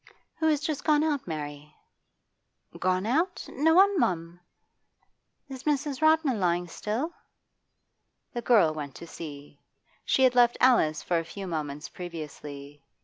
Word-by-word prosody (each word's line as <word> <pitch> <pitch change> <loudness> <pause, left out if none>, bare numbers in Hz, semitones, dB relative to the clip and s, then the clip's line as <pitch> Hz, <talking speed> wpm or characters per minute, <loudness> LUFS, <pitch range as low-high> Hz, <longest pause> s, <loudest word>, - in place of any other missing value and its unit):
'Who 320 - +2
has 300 -2 +2
just 305 -2 -3
gone 300 -1 +3
out, 295 -7 -1
Mary?' 150 -2 -6 1.0
'Gone 185 +1 +1
out? 330 +10 0
No 320 +4 +2
one, 390 0 +5
mum!' 170 - -1 1.1
'Is 265 -2 -8
Mrs. 285 -2 -1
Rodman 315 -6 +3
lying 175 -1 +1
still?' 225 - -3 1.2
The 240 - -3
girl 210 -10 +4
went 145 -3 -6
to - - -9
see. 145 -3 -10 0.4
She 265 - +2
had 255 -1 +5
left 240 -1 +4
Alice 160 -12 +3
for 175 -1 +1
a - - -4
few 195 +4 -8
moments 150 -3 -4
previously. 145 -4 -9
190 Hz, 140 wpm, -27 LUFS, -, 1.2 s, one